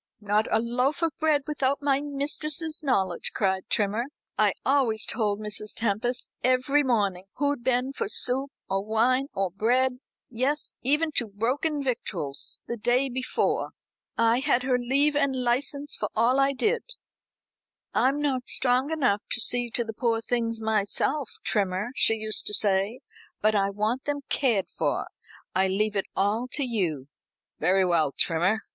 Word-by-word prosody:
"Not 210 +1 +1
a - - +3
loaf 250 +7 0
of 330 - +2
bread 310 -2 +2
without 280 -2 -1
my 280 -1 +2
mistress's 300 +3 -3
knowledge," 190 - 0
cried 190 0 0
Trimmer. 215 +2 0 0.3
"I - - +3
always 255 -6 +2
told 210 -3 0
Mrs. 210 0 -4
Tempest 235 +3 -1 0.2
every 255 +3 +3
morning 205 -8 0
who'd 285 -3 0
been 255 +2 +1
for 200 - -3
soup, 260 +4 +2 0.2
or 195 0 -1
wine, 240 +5 +2
or 195 -2 0
bread 250 +6 +1 0.3
yes, 260 +5 -1
even 300 +5 +2
to 240 -5 -1
broken 270 +9 -1
victuals 180 - -2
the 235 - -3
day 250 +5 +2
before. 255 +1 -1 0.4
I 230 +1 +4
had 265 -3 +2
her 255 -1 +1
leave 280 +4 +2
and 280 -2 +2
license 270 +4 -1
for - - -3
all 240 +4 +3
I 275 0 +3
did. 435 - +1 1.1
'I'm 275 +3 +2
not 265 -4 -1
strong 255 +2 +2
enough 250 -11 +1
to - - +2
see 245 +1 +2
to 235 +1 -1
the 225 -1 -6
poor 230 0 0
things 230 -1 -1
myself, 220 +6 0
Trimmer,' 200 +2 0
she 225 - +4
used 215 -1 -2
to 210 - +1
say, 205 +4 +1 0.4
'but 215 +1 +3
I 200 -1 +2
want 215 +6 -1
them 290 0 -2
cared 230 -9 +1
for. - - 0 0.5
I 190 +1 +3
leave 210 +3 0
it 195 - -1
all 210 +5 +1
to 290 - 0
you.'" 175 - -1 0.5
"Very 185 +4 +3
well, 165 -5 +2
Trimmer. 175 +9 +1
240 Hz, 155 wpm, -26 LUFS, 210-275 Hz, 1.1 s, I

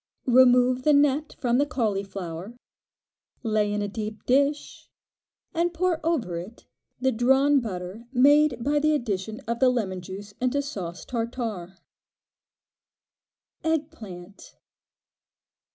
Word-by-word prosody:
Remove 250 0 +5
the 300 +3 +4
net 290 +1 +2
from 245 0 +1
the 285 - +3
cauliflower, 195 - -3 0.9
lay 215 -2 +1
in 205 0 -1
a - - -2
deep 215 +1 -6
dish, 280 +3 0 0.6
and 345 +1 0
pour 345 -1 0
over 265 - -1
it 200 +7 -11 0.3
the 260 +1 +2
drawn 265 +5 +4
butter 200 0 -6
made 280 -1 +4
by 290 +3 +2
the 305 +1 +2
addition 215 -4 -3
of 235 +1 -3
the 260 - +5
lemon 195 -7 -2
juice 195 +3 -9
into 255 +3 +1
sauce 190 -11 -5
tartare. 225 -6 -4 1.9
Egg 320 -1 0
Plant. 195 - -12
240 Hz, 120 wpm, -25 LUFS, 205-285 Hz, 1.9 s, Remove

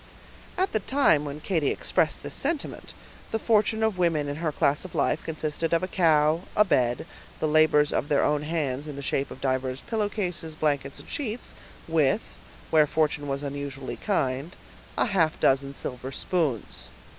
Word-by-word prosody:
At 375 +2 +1
the 220 - +2
time 205 - +3
when 145 +1 -6
Katy 160 -5 +1
expressed - - 0
this - - -6
sentiment, 325 -4 -3 0.4
the 225 - +1
fortune 220 0 +2
of 220 -4 +1
women 160 -4 +2
in 145 0 -3
her 160 -1 -1
class 145 0 +1
of 185 - -9
life - - +1
consisted 160 +1 -2
of 170 - +2
a - - 0
cow, 160 -3 +3 0.2
a 210 - +6
bed, 125 - +1 0.3
the 155 - +1
labors 150 -1 +4
of 145 - -1
their 145 - +3
own 150 0 +2
hands 150 -3 -2
in 150 - -6
the 140 - -6
shape 135 +1 0
of - - -10
divers 130 0 -1
pillowcases, 195 -8 -2
blankets, 140 -3 -1
and - - -13
sheets, 245 -4 -4 0.3
with, 160 +4 +2 0.5
where 155 -2 +5
fortune 150 -1 0
was 140 +1 -2
unusually 140 -1 -5
kind, 140 -5 -1 0.4
a - - +3
half 180 -8 +1
dozen 135 +1 +2
silver 125 +1 -5
spoons. 150 - -2
155 Hz, 170 wpm, -26 LUFS, 140-180 Hz, 0.5 s, a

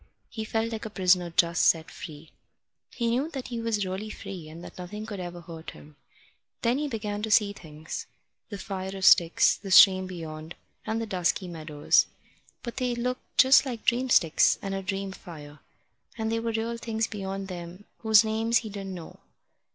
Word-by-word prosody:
He 220 -2 -5
felt 225 +1 -1
like 220 -1 -5
a - - -8
prisoner 180 -3 +2
just 170 +1 +2
set 165 0 +3
free. 155 -2 -10 0.6
He 235 - -2
knew 265 +6 0
that 270 -6 -6
he 235 -2 -4
was 220 -3 0
really 190 +3 -4
free, 180 -6 -8
and 165 +2 -10
that - - -11
nothing 210 +4 -6
could 210 -3 -6
ever 175 -1 -6
hurt 165 -1 -9
him. 150 0 -14 0.7
Then 240 +3 +2
he 300 - -1
began 210 -5 -4
to 220 - -3
see 210 -1 +4
things 155 -4 -8 0.4
the 205 - -6
fire 190 -1 -5
of 190 - -1
sticks, 170 -3 +6
the 200 - -9
stream 185 0 +7
beyond, 160 -2 -7 0.3
and 220 +1 -1
the 225 - -2
dusky 185 -2 0
meadows. 155 -3 +2 0.6
But 235 0 -6
they 250 -2 0
looked 250 +1 -4
just 260 +1 +7
like 245 -5 -6
dream 250 +2 +2
sticks, 165 -9 +4
and 195 -1 -4
a 195 - -2
dream 195 0 -3
fire, 150 -6 -11 0.6
and 220 0 -2
there 225 0 0
were 230 0 -1
real 225 +1 -2
things 225 -1 -1
beyond 195 -2 -5
them 175 +1 -8 0.2
whose 220 -1 +6
names 225 +2 +1
he 215 - -6
didn't 195 -2 -6
know. 170 -2 -10
195 Hz, 190 wpm, -27 LUFS, 175-225 Hz, 0.7 s, stream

